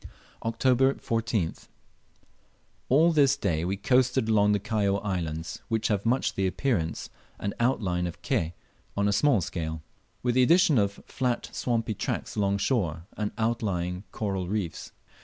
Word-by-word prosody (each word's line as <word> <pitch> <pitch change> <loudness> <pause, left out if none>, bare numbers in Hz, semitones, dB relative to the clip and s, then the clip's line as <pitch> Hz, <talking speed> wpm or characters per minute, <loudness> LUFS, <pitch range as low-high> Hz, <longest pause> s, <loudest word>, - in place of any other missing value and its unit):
October 130 +4 +3
14th. 115 -6 -2 1.2
All 160 +6 +5
this 140 -4 +4
day 80 -1 0
we 95 +3 -1
coasted 125 +2 +2
along 105 -2 +4
the 105 - +2
Kaióa 100 -2 0
Islands, 85 -4 -3
which 110 -2 0
have 105 0 0
much 125 +3 +1
the 95 -1 0
appearance 90 - -1 0.3
and 100 - -2
outline 95 -8 +1
of 85 - -7
Ke 80 +1 0 0.4
on 100 0 +2
a 100 - +2
small 110 +1 +3
scale, 80 -2 -4 0.4
with 120 -1 +2
the 130 - +4
addition 165 - +5
of 100 0 -1
flat 125 -2 -2
swampy 115 -2 -1
tracts - - -3
along 100 -1 +1
shore, 90 - 0
and 105 -1 -2
outlying 100 -6 -1
coral 95 -4 -2
reefs. 95 -4 -3
105 Hz, 145 wpm, -27 LUFS, 90-125 Hz, 1.2 s, All